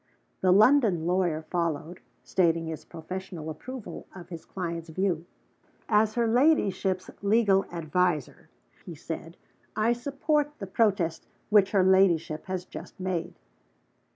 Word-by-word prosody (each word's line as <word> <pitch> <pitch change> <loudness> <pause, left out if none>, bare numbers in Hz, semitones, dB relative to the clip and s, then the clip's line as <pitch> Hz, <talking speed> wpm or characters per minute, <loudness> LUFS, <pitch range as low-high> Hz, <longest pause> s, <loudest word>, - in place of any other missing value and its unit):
The 185 - +3
London 210 - +5
lawyer 175 -3 +1
followed, 170 0 -2 0.2
stating 165 -2 +1
his 160 -1 -6
professional 170 -1 -7
approval 250 +9 -8
of 175 -2 -11
his 170 -3 -8
client's 170 -3 -5
view. 175 -1 -1 0.6
"As 215 0 +3
her 235 -1 +2
ladyship's 215 - +2
legal 200 -2 +3
adviser," 170 -2 -1 0.3
he 170 - -8
said, 165 +2 -7 0.4
"I 220 +2 +2
support 285 +4 -1
the 200 - -6
protest 190 -5 0 0.2
which 205 -2 +6
her 195 -3 +3
ladyship 180 -5 +3
has 185 -1 -3
just - - -10
made." 180 -2 -3
185 Hz, 125 wpm, -27 LUFS, 165-210 Hz, 0.6 s, which